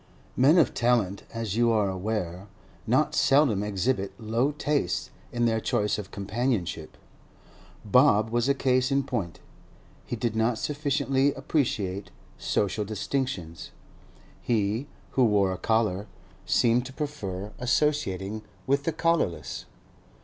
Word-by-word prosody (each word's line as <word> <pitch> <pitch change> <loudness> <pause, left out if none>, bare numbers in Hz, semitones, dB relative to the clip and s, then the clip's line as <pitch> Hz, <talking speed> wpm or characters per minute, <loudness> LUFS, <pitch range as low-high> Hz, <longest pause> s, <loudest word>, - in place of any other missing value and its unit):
Men 140 +7 +5
of 155 -8 +4
talent, 115 -5 +1
as 115 -3 -3
you 120 0 +3
are 105 -3 +2
aware, 95 -1 -3 0.4
not - - +2
seldom 135 -8 +4
exhibit 105 +1 -1
low 115 +5 0
tastes 145 -10 -1 0.2
in 120 0 0
their 115 -1 +2
choice 110 -3 0
of 100 -2 -7
companionship. 100 -6 -2 0.9
Bob 110 -2 +4
was 120 +2 +1
a 140 - +3
case 130 0 +2
in 140 0 +2
point; 115 -11 -4 0.6
he - - -4
did 115 -1 -2
not 110 +1 +1
sufficiently 140 -1 0
appreciate 110 - -1 0.3
social 105 +1 0
distinctions. 105 - -3 0.7
He, 110 +3 0 0.2
who 130 - +3
wore 100 -4 +3
a 95 - -3
collar, 110 -3 +1 0.4
seemed 120 +1 +3
to 130 - -11
prefer 105 - -5
associating 120 -7 0 0.2
with 140 +1 +1
the 165 - +1
collarless. 155 - -1
115 Hz, 125 wpm, -27 LUFS, 100-135 Hz, 0.9 s, Men